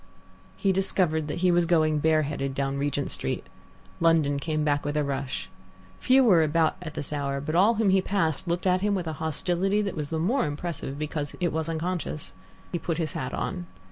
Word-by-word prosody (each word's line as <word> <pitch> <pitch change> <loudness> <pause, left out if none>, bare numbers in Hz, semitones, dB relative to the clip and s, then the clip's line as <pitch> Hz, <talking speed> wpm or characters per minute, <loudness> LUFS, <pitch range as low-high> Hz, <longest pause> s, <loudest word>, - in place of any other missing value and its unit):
He 195 - +2
discovered 180 -5 +1
that 155 +3 -4
he 180 - +5
was 175 -1 +3
going 155 -3 +3
bareheaded 150 -3 +1
down 140 0 -1
Regent 145 0 -1
Street. - - -3 0.5
London 160 -4 +3
came 155 +1 -1
back 145 -1 +1
with 145 +1 -2
a 150 - +2
rush. 135 -2 -3 0.5
Few 265 +1 +5
were 185 -9 +6
about 160 +1 +2
at 160 -3 -7
this 145 +1 -4
hour, 140 -1 -1
but 150 +3 -4
all 200 +7 +5
whom 215 -3 +3
he 190 0 +4
passed 185 -4 -1
looked 175 +2 -1
at 185 0 +3
him 205 0 +1
with 180 -3 -2
a 160 - -3
hostility 180 +6 0
that 200 - -3
was 150 -3 -4
the 160 - -2
more 225 - +1
impressive 145 -2 -4
because 150 -1 -3
it 175 -3 0
was 160 0 -2
unconscious. 165 -2 -3 0.4
He 175 - -1
put 165 0 -2
his 160 -4 -2
hat 130 - -3
on. 180 -2 -3
160 Hz, 205 wpm, -27 LUFS, 145-180 Hz, 0.5 s, were